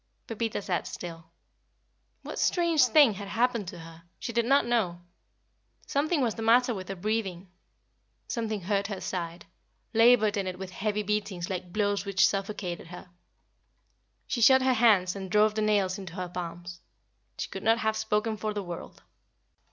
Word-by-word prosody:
Pepita 225 -2 -3
sat 180 -3 -2
still. 165 -2 -8 1.0
What - - -6
strange 335 -6 +3
thing 250 -1 +6
had 200 +1 -7
happened 230 -1 0
to 175 - -7
her? 165 0 -12 0.2
She 235 - -5
did 235 0 +1
not 275 +3 +4
know. 215 -8 0 0.9
Something 295 +2 0
was 230 -3 +1
the 225 - -7
matter 240 +2 +4
with 190 -3 -7
her 195 - -3
breathing. 195 -2 -3 0.8
Something 220 -4 -3
hurt 200 +2 0
her 200 -3 -5
side 170 -2 -5 0.5
labored 225 -2 +5
in 195 -2 -1
it 185 -1 -4
with 190 0 -7
heavy 210 +2 -2
beatings 200 -4 -2
like 180 -1 -5
blows 205 0 0
which 200 -1 +3
suffocated 195 -4 -4
her. 180 0 -11 1.1
She 240 - -2
shut 260 +3 +6
her 260 0 +3
hands 210 -6 +4
and 190 -1 -6
drove 210 +2 +4
the 215 - -1
nails 205 -3 +1
into 185 -4 -8
her 180 -2 -4
palms. 175 0 -7 0.6
She - - -3
could - - -6
not 225 +1 +3
have 220 -2 0
spoken 220 0 -1
for 215 0 -3
the 205 - -2
world. 175 -2 -8
205 Hz, 165 wpm, -28 LUFS, 185-225 Hz, 1.1 s, thing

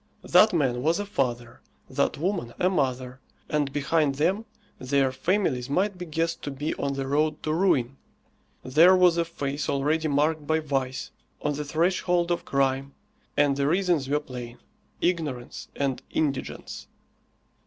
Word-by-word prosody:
That 185 +4 +6
man 130 -8 +1
was 160 +5 +2
a 205 - -3
father, 120 - -2 0.3
that - - 0
woman 170 -7 -2
a 180 +1 +3
mother, 130 -5 -1 0.3
and 145 -2 0
behind 145 0 +1
them 190 +10 +1 0.3
their 135 0 +1
families 135 -3 0
might 185 +5 0
be 180 - -6
guessed 165 +1 -1
to - - -4
be 145 +3 -3
on 140 0 -2
the 135 0 -3
road 150 +2 0
to 155 - 0
ruin. 150 -8 +1 0.7
There 165 +8 +6
was 180 -2 +5
a 170 - +2
face 145 -3 -3
already 150 +3 +1
marked 150 +1 +1
by 160 0 +2
vice, 135 -4 -2 0.3
on 150 - +1
the 150 +1 -3
threshold 175 +3 +1
of 175 - -1
crime, 135 0 0 0.4
and 145 -1 +4
the 140 0 +1
reasons 170 -5 +1
were 145 +1 +2
plain 125 -4 -8 0.5
ignorance 155 -9 -2
and 135 -2 -1
indigence. 140 -4 -3
145 Hz, 155 wpm, -26 LUFS, 135-170 Hz, 0.7 s, That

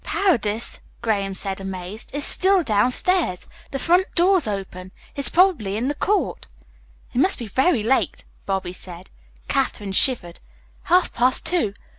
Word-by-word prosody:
"Paredes," 235 - 0 0.2
Graham 200 -4 -1
said, 195 0 -3
amazed, 190 +2 -7
"is 290 +1 -1
still 380 -1 +3
downstairs. 250 - +1 0.2
The 275 - -4
front 355 +6 +2
door's 360 - +3
open. 190 -2 -6 0.2
He's 280 - +4
probably 320 - +2
in 245 +5 -1
the - - -1
court." 405 +7 -1 0.7
"It 245 - -1
must 375 +8 +4
be 235 - -6
very 260 - +1
late," 260 +4 0 0.2
Bobby 190 -2 -2
said. 180 0 -10 0.4
Katherine 235 -7 -1
shivered. 190 -5 +1 0.5
"Half 360 +1 +2
past 250 +2 +2
two. 320 - -1
235 Hz, 140 wpm, -22 LUFS, -, 0.7 s, He's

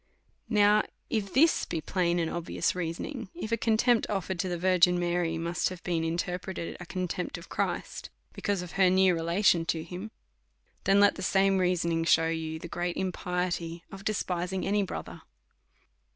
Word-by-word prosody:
Now 210 -1 +5 0.3
if 205 -4 -1
this 320 +5 +4
be 165 - -3
plain 175 +2 0
and 165 -1 +1
obvious 170 0 -1
reasoning, 180 - -4
if 280 -10 -5
a - - +4
contempt 230 +1 +2
offered 190 -3 -2
to 185 - 0
tlie 175 -1 -2
Virgin 180 0 +4
Mary 175 -1 0
must 170 +1 -1
have 185 -1 -9
been 170 -2 -1
interpreted 175 +2 -3
a 175 - -9
contempt 180 -1 -3
of 170 - -12
Christ, - - -3 0.2
because 200 -3 -1
of 175 - -9
her 190 -2 +4
near 185 0 +4
relation 170 +1 +2
to 160 -1 -1
him; 180 +5 -7 0.8
then 195 +1 +5
let 205 0 +5
the - - -6
same 195 +1 +3
reason 170 -2 +1
shew 165 0 +4
you 160 -1 -3
the 165 - -8
great 175 +1 -3
impiety 180 -2 -2
of 195 0 -9
despising 185 -3 -2
any 205 +1 +2
brother. 195 - -5
180 Hz, 165 wpm, -29 LUFS, 170-195 Hz, 0.8 s, Now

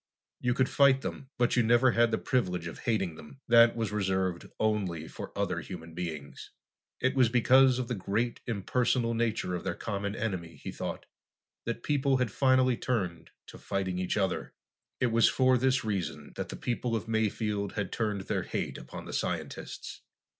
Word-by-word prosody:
You 125 -1 +1
could 130 - +3
fight 135 -1 +4
them, 135 - -6
but 120 0 +2
you 125 - +5
never 120 +3 +5
had 120 0 +4
the 110 - +1
privilege 90 -9 0
of 85 - -7
hating 95 -7 0
them. 70 -3 -13
That 115 0 +7
was 115 -2 -2
reserved 95 -3 -1
only 95 -7 0
for - - -8
other - - 0
human 85 -2 -9
beings. 80 -5 -6 0.5
It 130 +1 +1
was 130 -4 +4
because 130 +2 +5
of 125 -2 -2
the 125 - -2
great, 110 +4 -1
impersonal 120 +2 +1
nature 115 -5 0
of 90 - -3
their - - -2
common 100 -1 -3
enemy, 90 -8 -3
he - - -7
thought, - - -5 0.6
that 115 0 -3
people 140 -2 +2
had 125 -4 0
finally 130 0 +3
turned 90 -11 -2 0.2
to - - -12
fighting 95 -2 -2
each 90 +3 -1
other. 95 -2 -1 0.4
It 125 - +2
was 115 0 +5
for 130 -1 +4
this 130 0 +2
reason 100 -5 -3
that - - -4
the - - -5
people 120 -1 -2
of 110 0 -3
Mayfield 105 -2 -1
had 100 -3 -3
turned 105 -3 -1
their - - -1
hate - - -3
upon - - -9
the - - -7
scientists. - - -4
110 Hz, 180 wpm, -30 LUFS, 95-125 Hz, 0.6 s, That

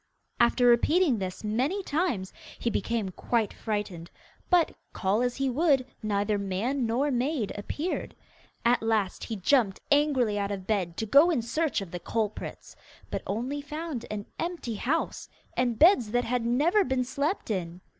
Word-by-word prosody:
After 240 +1 +4
repeating 255 - +4
this 185 +1 -5
many 260 - 0
times, 290 - -1 0.2
he 235 - -1
became 220 -1 -1
quite 220 +3 -1
frightened, 205 -6 -4 0.4
but, 355 -3 +4 0.2
call 195 +4 +1
as 245 0 0
he 275 0 0
would, 275 0 +2 0.2
neither 205 -1 0
man 225 +7 -1
nor 265 +6 +1
maid 250 -2 0
appeared. 295 - -4 0.5
At 240 +1 +4
last 220 -4 0
he 225 - -4
jumped 210 0 +2
angrily 270 -8 +3
out 200 0 -1
of 195 -2 -4
bed 185 -6 -1
to 220 - -1
go 285 +10 +6
in 285 -9 +1
search 305 +1 0
of 190 -4 -7
the 175 - -4
culprits, 215 +2 -4 0.4
but - - -2
only 250 +8 -2
found 300 -3 -5
an 210 -1 -4
empty 335 -9 -3
house, 270 +10 -2 0.3
and 245 -2 +1
beds 300 - +6
that 245 +2 +1
had 240 -1 0
never 320 - +3
been 260 -1 0
slept 280 - -2
in. 175 -2 -3
235 Hz, 160 wpm, -28 LUFS, 205-285 Hz, 0.5 s, go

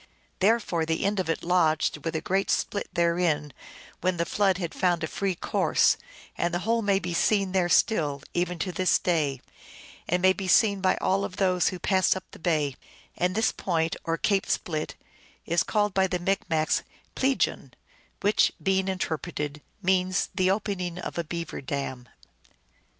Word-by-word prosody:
Therefore 200 -5 +2
the 160 +3 -1
end 200 0 +1
of 180 -3 -2
it 165 - -1
lodged 160 -4 +1
with 165 -1 -3
a 160 - -1
great 195 +3 0
split 200 - -1
therein 170 -4 +1 0.5
when 185 0 0
the 170 - 0
flood 195 0 +2
had 170 -3 -4
found 175 -3 +1
a - - 0
free 195 +2 -2
course, - - +2 0.4
and 170 - 0
the 175 - 0
whole 230 +1 +2
may 200 -2 +2
be 180 -2 -3
seen 195 +2 +2
there 185 -2 +1
still, 150 -10 +2
eveirto 175 +1 -1
this 185 0 +3
day, 150 -7 0 0.7
and 180 - +2
may 185 0 +6
be 195 -1 -5
seen 200 +1 +4
by 185 - +3
all 195 +1 +1
of 180 - -5
those 185 -2 +2
who 185 - -5
pass 185 +1 +2
up 190 - -5
the - - -13
bay; 155 -5 0 0.4
and 180 +1 0
this 220 +1 +2
point, 165 -3 -1
or 165 0 -1
Cape 200 +1 +1
Split, 155 -3 -2 0.5
is 170 +1 +2
called 210 -2 0
by 190 0 +3
the 180 - -1
Micmacs 175 -4 0 0.3
Pleegun, 265 0 0 0.5
which, 205 +1 +3
being 190 -1 +1
inter 185 -5 -1
preted, 150 -3 -5 0.2
means 185 0 +1
the 185 -2 +2
opening 190 -4 -2
of 180 - -5
a - - 0
beaver 165 -1 -5
dam. 130 -2 -4
180 Hz, 170 wpm, -27 LUFS, 165-195 Hz, 0.7 s, may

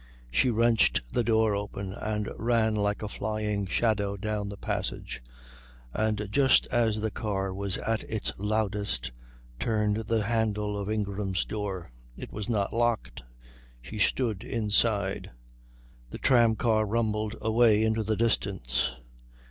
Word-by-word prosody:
She 95 - +3
wrenched 115 - +2
the 120 - +2
door 110 -2 +3
open 100 -1 -4
and 105 0 -2
ran 115 -1 +2
like 105 0 0
a - - -2
flying 105 -1 -2
shadow 100 -1 +1
down 105 0 -2
the 100 - -7
passage, - - -4 0.7
and 105 -1 0
just 135 +2 +4
as 110 -3 +2
the 110 0 -1
car 95 -3 -2
was 100 0 -1
at 115 0 -1
its 110 -3 -1
loudest 105 - -1 0.5
turned 105 - +1
the 115 -2 +1
handle 105 -2 0
of 100 0 -3
Ingram's 100 -2 -1
door. 95 - -4 0.3
It - - -8
was 105 +1 -4
not 105 -4 0
locked. 120 0 0 0.6
She - - -8
stood 110 0 +1
inside. 105 -4 +1 0.8
The - - -7
tramcar 115 -3 +3
rumbled 110 -1 0
away 110 -1 +4
into 110 0 +1
the 110 0 0
distance. 65 - 0
105 Hz, 130 wpm, -28 LUFS, 100-110 Hz, 0.8 s, just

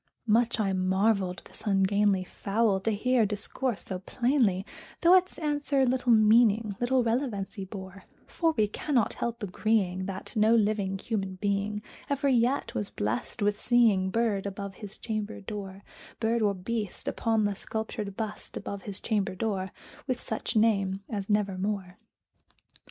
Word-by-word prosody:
Much 230 +1 +2
I 195 -3 +1
marvelled 190 0 +1
this - - -10
ungainly 195 0 +3
fowl 200 +2 0
to 210 - -1
hear 245 +3 +2
discourse 215 +3 -2
so 185 -2 -4
plainly, 230 -3 +1 0.4
Though 345 +1 +6
its 370 0 +4
answer 290 -3 +1
little 250 -1 +2
meaning 220 -1 +5
little 250 +1 +2
relevancy 225 -5 -2
bore; 190 -1 -9 0.2
For 330 -1 +1
we 215 -1 +3
cannot 245 +2 0
help 235 -1 -3
agreeing 190 -2 0
that 190 -1 -7
no 220 +1 +5
living 205 -3 +1
human 195 -2 -3
being 205 +2 -1 0.3
Ever 280 0 +1
yet 250 +2 +2
was 205 - -1
blessed 115 - -3
with 205 0 +1
seeing 220 -6 +4
bird 210 -2 0
above 200 0 -5
his 205 +1 -9
chamber 215 -2 -4
door 200 -1 -7 0.4
Bird 230 +1 +1
or 205 -2 +2
beast 210 +2 -4
upon 225 -2 +1
the 205 - +1
sculptured 210 -1 -5
bust 215 -2 -5
above 200 -1 -5
his 200 -1 -6
chamber 205 -4 0
door, 190 -2 -2 0.4
With 255 -2 -1
such 220 -1 -3
name 200 -3 +2
as 200 -2 -3
"Nevermore." 200 -2 -1
210 Hz, 145 wpm, -28 LUFS, 195-230 Hz, 0.4 s, Though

